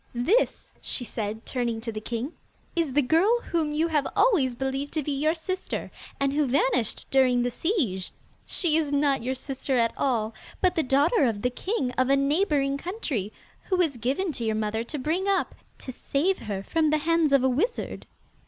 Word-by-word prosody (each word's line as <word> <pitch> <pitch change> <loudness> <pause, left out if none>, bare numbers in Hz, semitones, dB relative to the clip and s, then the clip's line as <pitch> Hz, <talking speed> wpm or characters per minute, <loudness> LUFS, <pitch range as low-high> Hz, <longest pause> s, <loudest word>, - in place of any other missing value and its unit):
'This,' 360 - +1
she 245 - -3
said, 220 0 -4
turning 240 -3 -1
to 230 0 -4
the 215 -1 -5
king, 235 +7 -4 0.4
'is 325 -6 0
the 290 +1 +3
girl 365 - +3
whom 320 -3 +1
you 310 +2 +1
have 300 -4 +1
always 285 - +3
believed 270 +2 -2
to 310 - -2
be 290 - -2
your 305 +4 +1
sister, 370 +3 -4 0.3
and 275 0 +1
who 295 -1 +2
vanished 250 -3 +1
during 255 -2 +4
the 245 - 0
siege. 235 - -1 0.4
She 335 -5 +1
is 305 -3 0
not 280 -2 +2
your 255 +3 -2
sister 270 0 -2
at 230 -1 +2
all, 225 -5 0 0.3
but 370 -1 +3
the 325 - +1
daughter 285 - +3
of 215 -4 -1
the 250 - +1
king 275 - -2
of 255 0 +3
a 275 - +5
neighbouring 280 -1 +1
country, 285 - -3 0.3
who 375 - 0
was 320 -8 +1
given 275 - -1
to 245 - -6
your 220 -1 0
mother 220 +1 -1
to 300 - -5
bring 325 +8 -1
up, 395 -1 +1 0.2
to 255 - -8
save 310 +9 0
her 200 -2 -4
from 315 +7 +1
the 305 - +3
hands 325 0 +2
of 275 -2 +5
a - - +4
wizard. 315 - -1
275 Hz, 195 wpm, -26 LUFS, 245-325 Hz, 0.4 s, a